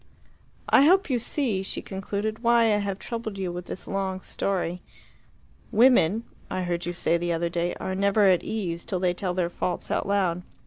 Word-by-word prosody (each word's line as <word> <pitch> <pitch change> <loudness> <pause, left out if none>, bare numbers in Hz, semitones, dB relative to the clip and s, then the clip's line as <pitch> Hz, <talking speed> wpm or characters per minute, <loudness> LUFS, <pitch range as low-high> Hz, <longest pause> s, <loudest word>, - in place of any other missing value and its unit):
"I 275 - +6
hope 370 -1 +4
you 245 - +2
see," 230 -5 0
she 195 - -4
concluded, 205 +3 -3
"why 235 -2 +4
I - - +3
have 200 -2 -2
troubled 225 -2 -5
you 185 -2 -2
with 175 0 -6
this - - -6
long 190 -1 -2
story. 180 -3 -2 0.9
Women 225 -3 +4 0.3
I 185 0 -2
heard 175 -1 -2
you - - -1
say 170 -1 +1
the 175 0 -1
other 170 +1 -1
day 170 +1 -1
are 190 - -4
never 200 +2 +2
at 185 -3 +4
ease 175 -6 -3
till 185 - -2
they 180 -1 +1
tell 180 0 -3
their 175 -2 0
faults 180 - -3
out - - 0
loud. 185 -4 +1
190 Hz, 190 wpm, -26 LUFS, 175-215 Hz, 0.9 s, I